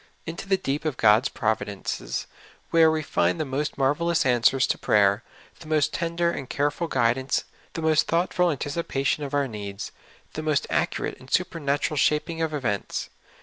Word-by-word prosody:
Into 165 +4 -6
the 195 - +4
deep 145 -5 -2
of 155 -5 -2
God's 110 +4 +5
providences, 110 -3 -2 0.5
where 165 -1 +6
we 160 0 0
find 90 -9 +1
the 155 - 0
most 140 +3 -2
marvelous 150 +4 +1
answers 125 +1 +4
to - - -1
prayer, 100 0 +3 0.4
the 165 - -12
most 155 -1 +1
tender 170 0 0
and 135 -6 -6
careful 145 +4 0
guid 120 -3 +2
ance, 130 0 -1 0.3
the 165 - -4
most 155 -1 +3
thoughtful 175 +1 +2
anticipation 145 -1 -1
of 140 0 -3
our 140 -1 +2
needs, 100 -3 -6 0.4
the 155 - -4
most 155 -2 +1
accurate - - -1
and 130 - -15
supernatural 150 -4 0
vShaping 165 +2 +1
of 160 - -1
events. 120 -10 -2
145 Hz, 165 wpm, -25 LUFS, 125-160 Hz, 0.5 s, where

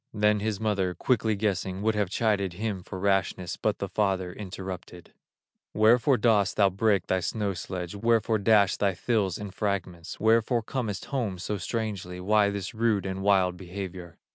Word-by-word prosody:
Then 105 0 +3
his 105 -1 -2
mother, 95 -5 0
quickly 110 +2 +1
guessing, 100 -2 -2
Would 110 0 +2
have 105 -3 0
chided 100 -3 0
him 105 0 -3
for 95 +2 -8
rashness, 95 -2 0
But 105 -1 -1
the 100 - -3
father 95 -2 -1
interrupted: 95 -3 -8 0.6
"Wherefore 120 +5 +4
dost 105 -3 +2
thou 100 -2 +4
break 100 -1 +1
thy 95 - +1
snow 100 +3 -2
sledge, 90 -1 -5
Wherefore 115 +1 +1
dash 100 -2 +4
thy 100 -2 +1
thills 105 -7 0
in 105 -1 -7
fragments, 95 -3 -3
Wherefore 115 +1 +3
comest 110 -5 -3
home 110 -9 -1
so 100 +3 -3
strangely, 100 -6 -4
Why 105 +2 +3
this 100 -2 -4
rude 110 -3 +1
and 95 0 -3
wild 95 -3 +3
behavior?" 90 -2 -7
100 Hz, 165 wpm, -27 LUFS, 95-110 Hz, 0.6 s, Wherefore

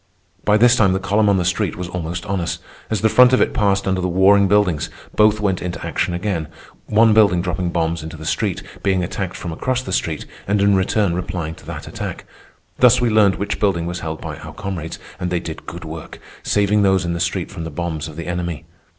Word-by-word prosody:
By 105 0 +4
this 120 +2 +6
time 100 -5 +3
the 95 - 0
column 105 +2 +2
on 100 - +3
the 90 - 0
street 95 0 0
was 90 0 -5
almost 85 0 -4
on 100 -2 -1
us. 85 - -2 0.3
As 110 - -1
the 110 - +4
front 125 +3 +6
of 130 - +5
it - - +2
passed 100 -2 +1
under 95 -1 +1
the 90 - 0
warring 95 +2 +5
buildings, 95 -6 +2 0.3
both 105 0 +4
went 95 -3 0
into 90 -1 -5
action 90 - -1
again—one 100 +4 0
building 100 -5 +5
dropping 90 0 -1
bombs 85 -1 -1
into 80 0 -8
the 80 - -9
street, 75 - -1 0.2
being 95 -2 +1
attacked 95 +1 -4
from 85 - -5
across 130 +10 -1
the 95 - -5
street, 80 -4 -1 0.2
and 100 +1 +2
in 100 0 +4
return 95 0 +1
replying 85 -2 -3
to - - -16
that - - -7
attack. - - -6 0.5
Thus 125 -2 +6
we 120 -2 +1
learned 105 -3 +4
which 100 - -3
building 95 -5 +1
was 85 +1 -4
held 80 0 -5
by - - -6
our - - -9
comrades, 85 -4 -5 0.2
and 90 - -2
they 90 -1 0
did 80 -2 -8
good - - -7
work, - - -8 0.2
saving 105 0 +2
those 95 -2 +3
in 85 - -1
the 85 - -3
street 85 +1 -2
from 90 -5 -6
the 80 - -4
bombs 80 -1 -4
of 80 - -10
the 85 +1 -6
enemy. 85 -3 -3
95 Hz, 230 wpm, -20 LUFS, 85-105 Hz, 0.5 s, this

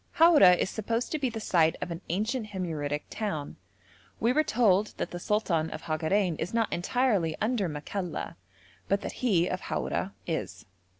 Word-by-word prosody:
Haura 310 - +7
is 190 - -1
supposed 230 +2 -2
to 310 - -1
be 265 -3 0
the 225 -1 -5
site 165 -6 +3
of 175 - -4
an 165 +1 -5
ancient 215 +6 -1
Himyaritic 155 -7 -3
town. 180 -10 -4 0.6
We 235 +3 +2
were 310 - +3
told 215 -6 +2
that - - -3
the 175 - -5
sultan 175 -6 0
of 155 - -7
Hagarein 165 +2 0
is 180 +7 -3
not 230 -1 +1
entirely 190 -4 +1
under 215 -4 0
Makalla, 170 +5 -4 0.5
but 200 +1 +1
that - - -4
he 185 -9 +3
of 185 - -3
Haura 195 - -2
is. 160 -8 -4
195 Hz, 170 wpm, -28 LUFS, 165-225 Hz, 0.6 s, Haura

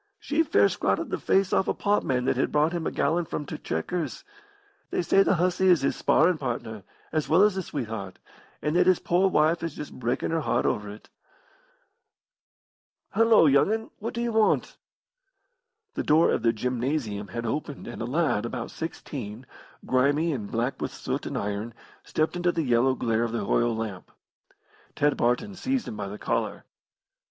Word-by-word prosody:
She 295 +3 0
fair 325 - +4
scratted - - -1
the - - -1
face 195 -1 +2
off 190 - +2
a - - 0
potman 135 -11 0
that 130 - +2
had 130 - 0
brought 150 +3 +2
him 170 -2 -2
a - - -2
gallon 165 +4 +1
from 150 - -4
t' - - -6
'Chequers.' 165 - -3 0.7
They - - -1
say 195 - +4
the 195 - +3
hussy 180 +2 +1
is 175 -6 +5
his 135 - 0
sparrin' 170 -2 +3
partner, 115 -5 -4 0.3
as 155 -1 -1
well 170 +5 +5
as 210 -1 +4
his 190 -2 -4
sweetheart, 110 -8 -5 0.5
and 150 +2 0
that 180 +1 +4
his 185 -2 +5
poor 180 +3 +2
wife 160 0 +2
is 165 -2 -4
just 150 - -7
breakin' 125 +4 -2
her 165 - +1
heart - - 0
over 105 -1 -1
it. 105 +1 -12 2.0
Hullo, 225 -3 +5
young 140 +6 +4
'un, 220 0 -2
what 230 +3 -5
do 235 - -1
you 240 - -1
want?" 220 -1 +2 1.2
The - - -2
door 155 +2 +4
of - - 0
the 115 - +3
gymnasium 120 -2 -2
had 115 +6 -5
opened 145 +4 -4
and 120 - -7
a - - -2
lad, 145 -4 +1
about 120 - -5
sixteen, 130 -8 -6 0.4
grimy 145 +5 +2
and 105 -7 -5
black 120 +4 -2
with - - -2
soot - - -4
and - - -3
iron, 105 +3 -3 0.3
stepped 155 +2 -1
into 175 0 +1
the 165 -2 -1
yellow 125 0 +3
glare 115 -2 0
of 115 -1 -1
the 110 -4 -2
oil 120 +2 +2
lamp. 110 -5 -5 0.9
Ted 145 0 +2
Barton 125 +13 0
seized 260 +6 -2
him - - -5
by 100 -1 -4
the 100 +2 -7
collar. - - -2
145 Hz, 185 wpm, -26 LUFS, 115-175 Hz, 2.0 s, is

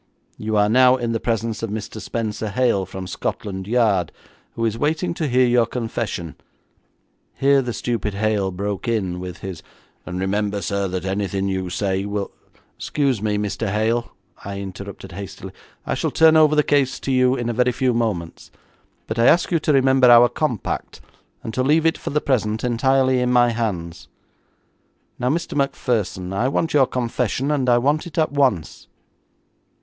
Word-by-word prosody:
You 110 0 -2
are 105 0 +4
now 125 +3 +5
in 120 -2 -2
the 115 - -1
presence 115 -1 -2
of 115 - -3
Mr. 110 +1 -6
Spenser 110 -2 -3
Hale, 105 -4 +1
from 95 0 -7
Scotland 95 +1 -4
Yard, 105 -7 +2 0.4
who 115 - -1
is 110 -1 0
waiting 155 +7 -1
to 160 -2 -2
hear 130 0 +3
your 120 -2 +3
confession.' 115 - -4 1.0
Here 140 0 +3
the 125 -2 -3
stupid 115 -3 -3
Hale 105 -2 0
broke 100 +3 -4
in 95 -6 -1
with 90 -1 -7
his 95 -4 -6 0.4
'And 90 0 -5
remember, 100 +1 -1
sir, 100 +1 -1
that 95 0 -4
anything 95 0 -1
you 95 -1 -2
say 95 +2 -1
will 100 -1 -3 0.2
be - - -29
' - - -41
'Excuse 135 -7 0
me, 105 -1 0
Mr. 105 +1 -2
Hale,' 110 +3 0 0.3
I 100 0 -5
interrupted 100 0 -8
hastily, 100 +1 -8 0.3
'I - - -1
shall - - -1
turn 160 0 +5
over 155 -1 +5
the 150 - +4
case 140 -3 +1
to 135 - -3
you 130 0 +3
in 120 -3 -3
a 120 - -1
very 125 +2 +2
few 125 +1 0
moments, 105 -8 -3 0.6
but 110 +1 -4
I 115 - +5
ask 175 +2 +4
you 170 - +3
to 155 - 0
remember 130 -2 +4
our 120 0 +8
compact, 120 -5 -3 0.4
and 110 - -5
to 130 - 0
leave 150 +5 +3
it 165 - +2
for - - -5
the 150 +1 0
present 110 -5 0
entirely 130 +2 +2
in 125 0 +1
my 120 -1 +4
hands. 90 -8 -4 1.1
Now, 125 0 0
Mr 165 +3 -2
Macpherson, 115 -9 -1
I 115 +6 +1
want 155 +4 -1
your 140 -3 +5
confession, 125 +3 -1
and 135 -4 +1
I 120 - +5
want 145 +7 +1
it 165 - -11
at 155 -3 +2
once.' 130 - 0
115 Hz, 180 wpm, -21 LUFS, 100-130 Hz, 1.1 s, our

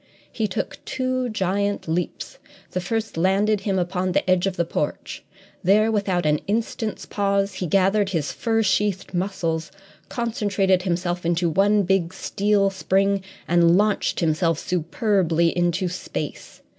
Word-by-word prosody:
He 220 - -1
took 190 - -4
two 255 -1 -1
giant 200 -1 -1
leaps. 175 - -3 0.3
The 185 - -2
first 220 +1 -3
landed 195 +4 +2
him 195 -1 -1
upon 180 0 -1
the - - +1
edge 185 0 +3
of 190 - -2
the 170 - +1
porch. - - -4 0.4
There, 210 +4 +4
without 195 -5 0
an 150 0 +2
instant's 220 +1 -2
pause, 200 -1 0
he 180 - -1
gathered 195 +3 +2
his 160 -6 -1
fur 225 -1 0
sheathed 195 -1 0
muscles, 170 -3 -2 0.4
concentrated 205 -5 +1
himself 175 -1 -2
into 170 0 +1
one 200 +5 +3
big 185 -2 0
steel 200 -1 +1
spring, 195 +1 +1 0.3
and 170 0 +4
launched 210 -2 +1
himself 165 0 +1
superbly 170 -1 +1
into 175 +1 +1
space. 180 +1 -6
190 Hz, 140 wpm, -23 LUFS, 175-205 Hz, 0.4 s, There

